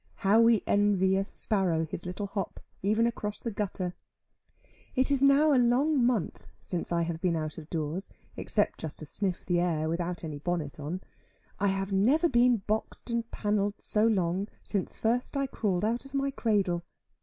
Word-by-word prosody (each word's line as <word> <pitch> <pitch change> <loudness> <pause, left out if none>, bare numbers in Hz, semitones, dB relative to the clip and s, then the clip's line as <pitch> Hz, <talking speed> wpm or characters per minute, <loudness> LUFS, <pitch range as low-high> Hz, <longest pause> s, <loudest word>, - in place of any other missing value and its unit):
How 210 +4 +6
we 230 -2 +5
envy 200 -2 +3
a 195 - +2
sparrow 190 -6 0
his 165 +3 -6
little 180 +3 -4
hop, 195 -2 -4 0.2
even 215 +4 +2
across 210 -3 -2
the 230 - -4
gutter. 190 -3 -3 1.0
It 260 +1 +3
is 275 -2 +2
now 280 +2 +5
a 255 - +5
long 260 +3 +3
month 235 -6 0
since 175 -2 -4
I 170 0 +2
have 165 -1 -4
been 180 -3 +1
out 155 0 -3
of 155 0 -12
doors, 165 +3 -3 0.3
except - - 0
just 160 -2 -5
to 155 - -7
sniff 185 +4 -1
the 175 -1 +2
air, 165 -3 0
without 170 +2 -2
any 155 -3 -5
bonnet 155 -2 -3
on. 160 +6 -4 0.6
I 200 - +2
have 195 0 -1
never 255 - +4
been 240 -6 +3
boxed 220 +3 -3
and 235 0 -1
pannelled 205 -1 -1
so 215 +1 +2
long 190 -2 +1 0.2
since 200 -3 -2
first 245 +5 0
I 275 - +1
crawled 205 -7 -1
out 235 +3 0
of 275 0 -10
my 275 0 +1
cradle. 200 -9 +1
200 Hz, 180 wpm, -29 LUFS, 175-235 Hz, 1.0 s, How